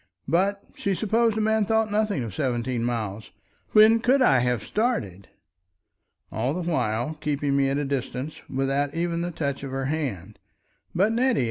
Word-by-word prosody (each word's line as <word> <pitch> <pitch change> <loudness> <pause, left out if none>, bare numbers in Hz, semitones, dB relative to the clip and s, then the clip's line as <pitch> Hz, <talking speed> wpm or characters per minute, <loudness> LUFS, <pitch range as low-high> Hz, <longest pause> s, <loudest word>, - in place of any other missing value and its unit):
But 195 +4 +1
she 195 -1 -1
supposed 220 +2 +1
a - - +1
man 220 0 +2
thought 220 0 +1
nothing 210 - 0
of 110 -5 -6
seventeen 120 -1 -1
miles. 110 -3 -3 0.4
When 220 +1 +7
could 255 +4 +3
I 135 - +5
have 125 -3 0
started! 105 - -2 1.0
All 125 +7 -1
the 175 -1 -3
while, 135 -1 -1
keeping 145 -2 0
me 135 -1 +2
at 135 - 0
a 145 - -1
distance, 135 +1 -4
without 135 +2 -1
even 170 0 -1
the 175 - -2
touch 140 -4 -3
of 140 - -5
her 135 0 -3
hand. 120 - -3 0.6
"But, 195 +5 +3
Nettie! 245 +1 +2
145 Hz, 165 wpm, -25 LUFS, 125-210 Hz, 1.0 s, When